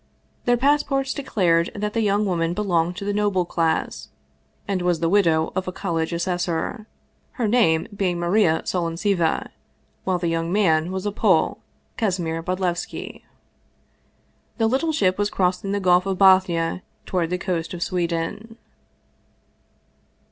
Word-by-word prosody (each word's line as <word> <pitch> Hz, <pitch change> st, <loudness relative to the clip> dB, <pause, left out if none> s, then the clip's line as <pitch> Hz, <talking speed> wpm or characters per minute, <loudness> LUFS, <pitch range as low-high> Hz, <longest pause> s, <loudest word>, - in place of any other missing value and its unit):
Their 245 Hz, 0 st, +3 dB
passports 275 Hz, 0 st, +1 dB
declared 175 Hz, -11 st, +1 dB
that 210 Hz, 0 st, -3 dB
the 230 Hz, -, +1 dB
young 205 Hz, 0 st, +2 dB
woman 170 Hz, -3 st, 0 dB
belonged 180 Hz, -4 st, 0 dB
to 200 Hz, -, -5 dB
the 205 Hz, -, -1 dB
noble 200 Hz, -3 st, +1 dB
class, 165 Hz, -1 st, -1 dB, 0.6 s
and 195 Hz, -2 st, -1 dB
was 175 Hz, -2 st, +1 dB
the 165 Hz, 0 st, +1 dB
widow 165 Hz, -5 st, +2 dB
of 190 Hz, -1 st, -2 dB
a -, -, -2 dB
college 165 Hz, -3 st, -2 dB
assessor, 175 Hz, +3 st, -2 dB, 0.5 s
her 235 Hz, -4 st, -1 dB
name 205 Hz, -9 st, +3 dB
being 185 Hz, -3 st, 0 dB
Maria 175 Hz, -2 st, +2 dB
Solontseva, 170 Hz, 0 st, 0 dB, 0.5 s
while 185 Hz, -, 0 dB
the 175 Hz, -1 st, -2 dB
young 165 Hz, 0 st, -1 dB
man 175 Hz, -4 st, +2 dB
was 190 Hz, +1 st, -4 dB
a 205 Hz, -, 0 dB
Pole, 205 Hz, -, +2 dB, 0.4 s
Kasimir 175 Hz, -7 st, -1 dB
Bodlevski. 180 Hz, 0 st, -3 dB, 1.4 s
The 225 Hz, -, +2 dB
little 270 Hz, +8 st, +1 dB
ship 200 Hz, -11 st, +1 dB
was 205 Hz, 0 st, +1 dB
crossing 185 Hz, +1 st, 0 dB
the 205 Hz, -, 0 dB
Gulf 180 Hz, 0 st, +3 dB
of 190 Hz, -1 st, -1 dB
Bothnia 185 Hz, -3 st, +4 dB, 0.2 s
toward 175 Hz, -3 st, -1 dB
the 180 Hz, -, -1 dB
coast 175 Hz, -3 st, -3 dB
of 175 Hz, -, -2 dB
Sweden. 175 Hz, +5 st, -3 dB
185 Hz, 140 wpm, -23 LUFS, 170-205 Hz, 1.4 s, Bothnia